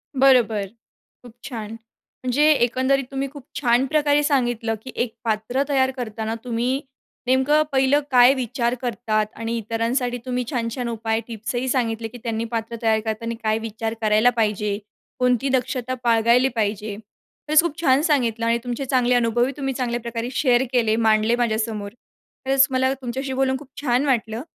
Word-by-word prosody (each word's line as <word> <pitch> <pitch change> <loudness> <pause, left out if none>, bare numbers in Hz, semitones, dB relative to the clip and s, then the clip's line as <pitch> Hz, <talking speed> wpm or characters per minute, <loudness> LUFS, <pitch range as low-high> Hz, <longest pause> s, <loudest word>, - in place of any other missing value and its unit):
बरोबर. 245 -6 +4 0.6
खूप 240 -2 -13
छान, 220 -5 -6 0.5
म्हणजे 255 +3 +1
एकंदरीत 260 0 +2
तुम्ही 270 0 -2
खूप 285 -3 -12
छान 245 -1 +3
प्रकारे 295 0 +2
सांगितलं 240 -6 0
की 255 - -8
एक 235 -2 -6
पात्र 225 +4 0
तयार 265 -2 +2
करताना 220 -2 -4
तुम्ही 250 +2 -1 0.5
नेमकं 265 +4 +3
पहिलं 270 +1 +3
काय 250 +1 +7
विचार 240 -2 -1
करतात? 230 -3 -1
आणि 230 +1 -3
इतरांसाठी 230 +3 -1
तुम्ही 250 -1 -1
छान 235 -4 -1
छान 250 -3 -3
उपाय 225 -1 -1
टिप्स 225 0 -5
ही 250 +2 -1
सांगितले, 230 -3 -1
की 245 - -11
त्यांनी 230 -1 -2
पात्र 230 0 -3
तयार 220 -1 +2
करताना 230 +1 -3
काय 220 0 +1
विचार 225 0 -4
करायला 215 +2 +4
पाहिजे, 210 -2 0 0.4
कोणती 250 +1 +2
दक्षता 255 -1 -1
बाळगायली 235 +2 +4
पाहिजे. 210 -1 -2
खरंच 295 +8 -1
खूप 330 -2 -4
छान 270 -3 +4
सांगितलं 240 -8 +1
आणि 230 0 +2
तुमचे 245 +2 -3
चांगले 250 -1 +2
अनुभव 240 0 +2
ही 265 - -2
तुम्ही 270 -2 -2
चांगल्या 240 -2 -2
प्रकारे 235 0 -4
शेअर 255 -2 +3
केले 230 -4 +2
मांडले 220 0 +3
माझ्यासमोर 220 -3 -1 0.5
खरंच 270 0 +4
मला 260 0 +2
तुमच्याशी 265 +1 -5
बोलून 265 0 +1
खूप 285 0 -13
छान 255 0 +1
वाटलं 230 -4 0
240 Hz, 160 wpm, -22 LUFS, 225-260 Hz, 0.6 s, काय